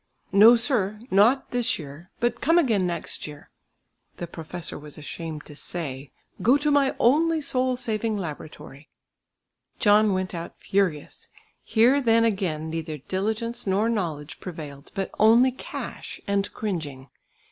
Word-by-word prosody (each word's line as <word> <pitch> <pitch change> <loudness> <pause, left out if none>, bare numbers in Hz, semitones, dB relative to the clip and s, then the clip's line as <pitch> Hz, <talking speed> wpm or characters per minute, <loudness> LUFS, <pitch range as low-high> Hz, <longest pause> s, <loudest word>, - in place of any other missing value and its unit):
"No, 215 +5 +8
sir, 230 -4 +1
not 225 +8 +4
this 245 +1 +1
year; 150 +3 -10
but 240 0 0
come 330 +4 +4
again 220 - +3
next 170 -2 -4
year." 145 -1 -12 0.7
The 175 - -4
professor 170 0 -6
was 150 0 -10
ashamed 155 0 -7
to 150 - -11
say, 145 -4 -6 0.3
"Go 255 +5 +5
to 295 +1 +1
my 280 -2 +3
only 320 +6 +3
soul 255 -3 0
saving 220 -2 -1
laboratory." 155 -4 -8 0.9
John 210 0 +4
went 185 0 -2
out 170 -1 -7
furious. 185 -7 -1 0.4
Here 245 +5 +4
then 230 -2 +4
again 185 -8 -1
neither 160 -1 -4
diligence 220 - -3
nor 200 +4 +2
knowledge 165 -9 -3
prevailed, 150 -5 -9
but 195 -2 -3
only 235 +4 +6
cash 255 - -7
and 200 0 0
cringing! 150 -10 -5
200 Hz, 135 wpm, -25 LUFS, 160-235 Hz, 0.9 s, No